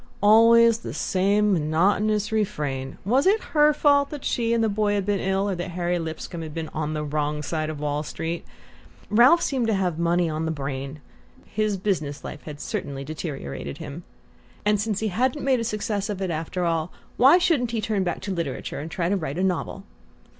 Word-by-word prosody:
Always 230 +2 +6
the - - -7
same 200 +2 +2
monotonous 200 +7 +1
refrain! 150 -11 -2
Was 260 - +3
it 420 +3 +4
her 300 -1 +6
fault 285 -1 +3
that 295 -3 -7
she 230 -1 0
and 230 -1 +2
the - - +3
boy 205 0 +1
had 200 -2 -1
been 205 -1 0
ill? 195 +1 0
Or 200 - 0
that 175 0 -4
Harry 175 0 0
Lipscomb 165 +1 -5
had 155 -2 -7
been 160 -1 -4
"on 155 0 -3
the 150 - -2
wrong 150 0 -2
side" 155 0 -2
of 155 -2 -5
Wall 145 0 -1
Street? 165 +2 -4 0.7
Ralph 250 +11 +6
seemed 255 -5 0
to 220 - +2
have 180 -4 -1
money 170 +1 +2
on 155 0 -2
the 160 - -1
brain: 140 0 -5 0.4
his 215 -2 -1
business 175 -7 -2
life 150 - -7
had 150 -2 -8
certainly 140 -2 -4
deteriorated 135 - -6
him. 145 +4 -7 0.6
And, 210 -1 +3
since 210 -1 -2
he 220 - 0
hadn't 255 +8 0
made 265 -2 +3
a - - -1
success 215 -2 -2
of 200 -2 -3
it 190 -2 -2
after 165 +3 -2
all, 165 0 -1 0.3
why 270 +7 +7
shouldn't 330 -9 +2
he 230 -1 -2
turn 210 -3 0
back 175 -2 -3
to 195 - -3
literature 165 -7 -4
and 155 +3 -6
try 170 +1 -1
to 200 - +1
write 155 -4 -4
his 185 - +1
novel? 190 +1 -2
190 Hz, 205 wpm, -24 LUFS, 155-215 Hz, 0.7 s, why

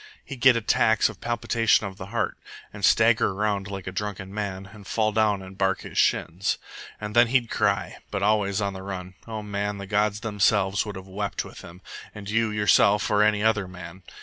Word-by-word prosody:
He'd 135 -4 -8
get 130 -1 +7
attacks 110 -1 +3
of - - -12
palpitation 115 -2 +1
of 95 -1 -7
the - - -8
heart, - - -2 0.4
and 105 -1 -10
stagger 110 -2 +4
around 100 -1 -1
like 95 -2 -6
a 95 - -4
drunken 95 0 -5
man, 100 -2 -5
and 105 -2 -13
fall 110 -1 +1
down 105 -2 +1
and 95 +1 -11
bark 95 -1 0
his - - -10
shins. 90 +4 +1 0.4
And 105 0 -6
then 120 0 +6
he'd 120 -1 +1
cry, 100 -2 0
but 100 - -3
always 105 -1 +1
on 100 -1 -1
the 95 - -8
run. 95 -1 -6
O 110 -1 -5
man, 105 0 -3
the 100 - -7
gods 105 +1 0
themselves 100 -1 +1
would 105 - -6
have 95 0 -8
wept 100 +1 -3
with - - -11
him, 90 +2 -13 0.3
and 100 -1 -9
you 115 0 +2
yourself 105 0 +3
or 105 0 +4
any 105 0 +3
other 110 -4 +2
man. 90 0 -10
105 Hz, 200 wpm, -25 LUFS, 95-110 Hz, 0.4 s, get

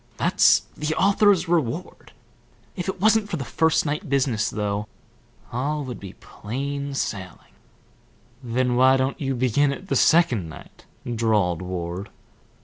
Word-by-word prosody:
That's - - +4
the 150 +1 -2
author's 200 -3 +3
reward. 165 0 -2 0.6
If 180 - -4
it 190 - -4
wasn't 215 +1 +3
for 175 - -2
the 135 - -5
first 160 +4 +1
night 150 +3 -3
business, 130 -5 +1
though, 105 0 -3 0.6
all 145 +4 -2
would 125 -2 -7
be 100 -2 -9
plain 140 +5 -5
sailing." 95 -8 -5 0.9
"Then 125 +1 0
why 130 +1 +5
don't 130 +3 -2
you 135 -1 -1
begin 130 +3 +2
it 185 +7 -8
the - - +1
second 130 - +3
night?" 80 - -14 0.3
drawled 105 -7 +1
Ward. 90 +2 -5
130 Hz, 140 wpm, -23 LUFS, 110-155 Hz, 0.9 s, why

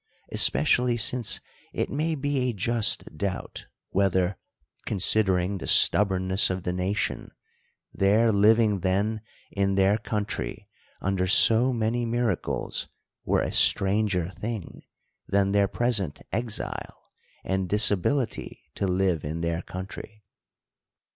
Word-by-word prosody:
especially 120 - +2
since 120 -1 0 0.3
it - - -1
may 155 +3 -2
be 140 -3 -1
a - - -2
just 115 +2 +1
doubt, 95 +4 -5 0.2
whether, 95 -1 +1 0.5
considering 95 -1 +1
the - - -7
stub 105 0 +5
bornness 95 +2 +2
of 95 -1 -3
the 90 - -2
nation, 95 +3 -2 0.6
their 110 +4 +3
living 105 0 +3
then 100 +4 -1 0.3
in 100 -1 0
their 100 +2 +3
country 105 -2 -4 0.3
under 95 -1 -1
so 115 +6 +4
many 120 0 -1
miracles 115 -5 -2 0.4
were - - +1
a - - -2
stranger 100 -3 +2
thing, 105 +1 -7 0.5
than 100 0 +1
their 100 0 +3
present 105 -9 -1
exile, 115 0 -5 0.3
and 95 -1 -2
disabihty 105 - +1
to 100 - -2
live 90 -3 0
in 80 +3 -4
their 85 0 -2
country. 100 +4 -9
100 Hz, 115 wpm, -26 LUFS, 95-115 Hz, 0.6 s, stub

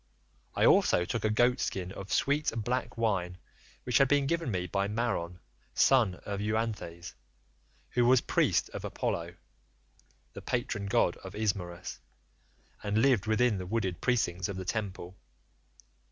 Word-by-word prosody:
I - - +3
also 90 - +4
took 115 +4 -3
a 110 - +2
goatskin 110 -5 +1
of 95 0 -8
sweet 145 +2 +1
black 120 +2 -2
wine 95 -6 0 0.5
which 125 -3 +2
had 135 - +5
been 145 0 +3
given 165 -1 -1
me 90 -4 -1
by 100 +3 -1
Maron, 105 -6 -2 0.4
son 115 -9 +4
of 100 -1 -3
Euanthes, 105 -5 -3 0.8
who 120 -1 +2
was 130 0 +6
priest - - +1
of - - -7
Apollo - - -3 1.0
the - - -8
patron 115 -5 -2
god 100 -5 +2
of 95 +1 -10
Ismarus, 95 -5 -3 0.8
and 105 0 -1
lived 120 -4 +3
within 110 -1 +2
the 90 - -6
wooded 95 -4 -2
precincts 90 -8 0
of 100 - -4
the 95 - -5
temple. 95 -3 -4
105 Hz, 140 wpm, -30 LUFS, 95-120 Hz, 1.0 s, was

